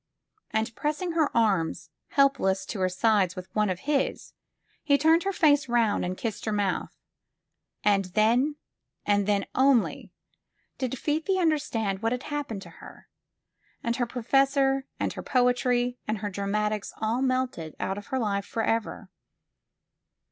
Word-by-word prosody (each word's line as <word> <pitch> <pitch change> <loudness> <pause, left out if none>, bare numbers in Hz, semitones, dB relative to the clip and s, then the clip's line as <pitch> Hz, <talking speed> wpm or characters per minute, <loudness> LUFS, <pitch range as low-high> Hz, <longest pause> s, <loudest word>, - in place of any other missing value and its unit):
And 220 +1 -1
pressing 305 +4 -2
her 320 -3 +2
arms 195 -8 +1 0.2
helpless 235 -10 +2
to 210 - -5
her 185 0 +2
sides 190 -1 +2
with 185 0 -9
one 210 -1 +2
of 185 -1 -3
his, 285 -1 -1 0.5
he 285 -1 +4
turned 320 +4 +4
her 395 - +1
face 295 -6 +3
round 230 -3 +2
and 180 +1 -3
kissed 225 -3 -4
her 220 - -1
mouth. 205 -2 -1 0.9
And 200 -2 +3
then, 230 +10 +2 0.5
and 205 -1 +2
then 205 -1 +1
only, 265 -3 +2 0.7
did 260 0 -2
Fifi 315 +8 0
understand 245 - 0
what 225 +1 +1
had 250 - -4
happened 285 -10 -4
to - - -12
her, - - -13 0.7
and 235 0 -1
her 245 - 0
professor 270 +2 +2
and - - -1
her - - -6
poetry 245 -1 +1
and 215 - -1
her 205 0 -4
dramatics 210 +1 -2
all 225 +3 -1
melted 255 - -1
out 195 +1 -2
of 205 - -13
her 265 - -2
life 200 -4 -1
forever. 225 -1 -2
230 Hz, 150 wpm, -27 LUFS, 205-275 Hz, 0.9 s, he